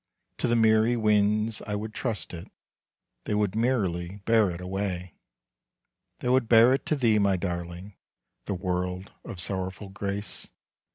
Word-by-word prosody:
To - - +1
the 120 - +2
merry 110 +1 +4
winds 105 0 +2
I 105 - -2
would 110 +1 -5
trust 115 -7 -2
it, 85 -1 -7 0.8
They 105 - -1
would 105 -1 0
merrily 100 -7 0
bear 110 -3 +4
it 85 -1 -5
away. 90 -1 -3 1.1
They 125 - -1
would 130 -2 +3
bear 115 +2 +7
it 135 - -2
to 155 - +2
thee, 115 -6 +3
my 100 -2 +3
darling, 85 +2 -5 0.5
The 100 - -2
word 90 0 -3
of 105 -7 -8
sorrowful 95 +2 -3
grace. 100 +1 -4
105 Hz, 150 wpm, -27 LUFS, 90-110 Hz, 1.1 s, bear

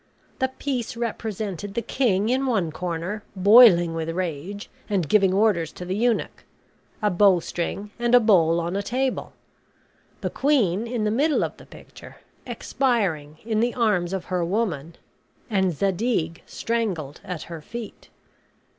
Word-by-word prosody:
The 260 - +2
piece 260 -3 -4
represented 210 -4 -4
the 235 - -1
king 215 -5 +1
in 265 +2 +1
one 195 -10 0
corner, 180 +5 -4
boiling 190 -4 +7
with 165 0 -3
rage, 180 +3 -4 0.2
and 190 -6 0
giving 195 +2 +4
orders 190 -5 +2
to 180 - -8
the 185 +1 -2
eunuch; 235 +2 0 0.6
a 210 - +3
bowstring, 190 +1 +1
and 240 +1 +3
a - - +9
bowl 170 -7 +4
on 170 +2 -3
a 200 - 0
table; 255 +6 -2 0.9
the - - -2
queen 235 - +1
in 230 -2 -2
the 210 - +1
middle 290 +7 +2
of - - -3
the - - -15
picture, - - -13 0.3
expiring 185 - -1
in 220 -2 0
the 240 +2 +1
arms 205 -7 +1
of 190 -2 -3
her 180 -2 -1
woman, 170 -5 -2 0.6
and 190 -3 +2
Zadig 180 - -1
strangled 190 -12 -3
at 180 -4 -5
her 165 -2 -8
feet. 235 +6 -9
200 Hz, 145 wpm, -24 LUFS, 175-230 Hz, 0.9 s, a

